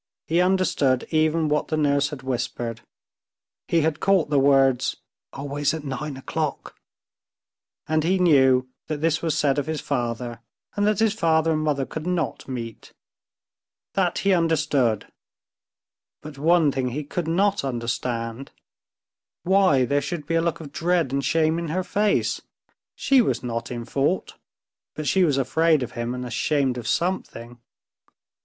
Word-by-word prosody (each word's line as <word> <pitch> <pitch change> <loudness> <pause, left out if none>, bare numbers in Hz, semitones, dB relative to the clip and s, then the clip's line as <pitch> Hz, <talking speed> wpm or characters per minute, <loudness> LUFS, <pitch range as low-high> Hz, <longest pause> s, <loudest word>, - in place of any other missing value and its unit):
He 165 +3 +2
understood 180 -8 +2
even 155 0 +2
what 150 0 0
the 155 - -1
nurse 145 -1 +2
had 145 -4 -8
whispered. 120 -3 -3 0.9
He 165 - +2
had 155 -1 0
caught 190 -6 +2
the 145 - +4
words 135 -2 +3 0.3
"always 145 +2 -2
at 160 - -6
nine 140 0 -5
o'clock," 150 +2 -4 1.1
and 155 0 +1
he 185 +4 +2
knew 130 -7 +4 0.2
that 155 - -2
this 160 -1 +1
was 165 -2 -1
said 145 -1 +2
of 145 - -3
his 160 -1 -2
father, 120 -1 -3 0.4
and 205 0 +1
that 210 -1 +2
his 220 -1 +2
father 165 -5 +2
and 155 -1 0
mother 145 -3 0
could 160 +4 -6
not 175 -5 -2
meet. 115 -4 -7 1.0
That 180 -3 +1
he 195 - +5
understood, 155 - +1 1.2
but 150 -1 -9
one 160 -1 +4
thing 130 -1 -1
he 145 +5 -4
could 165 +3 -4
not 195 +3 +1
understand—why 125 - -2
there 145 +3 +1
should 150 +1 -5
be 165 - -3
a 165 - +3
look 170 -1 -1
of 150 -4 -9
dread 170 -3 0
and 140 0 0
shame 160 +3 +2
in 170 - -4
her 185 +4 -1
face?... 205 +2 0 0.5
She 275 -2 +4
was 225 - -1
not 115 -1 -4
in 120 -1 -5
fault, 140 +9 -1 0.6
but 155 - -5
she 190 - +3
was 150 -6 +2
afraid 160 +2 +2
of 125 - -6
him 120 0 -3
and 125 0 -5
ashamed 130 +1 0
of 115 - -7
something. 120 -9 -2
150 Hz, 155 wpm, -24 LUFS, 130-165 Hz, 1.2 s, he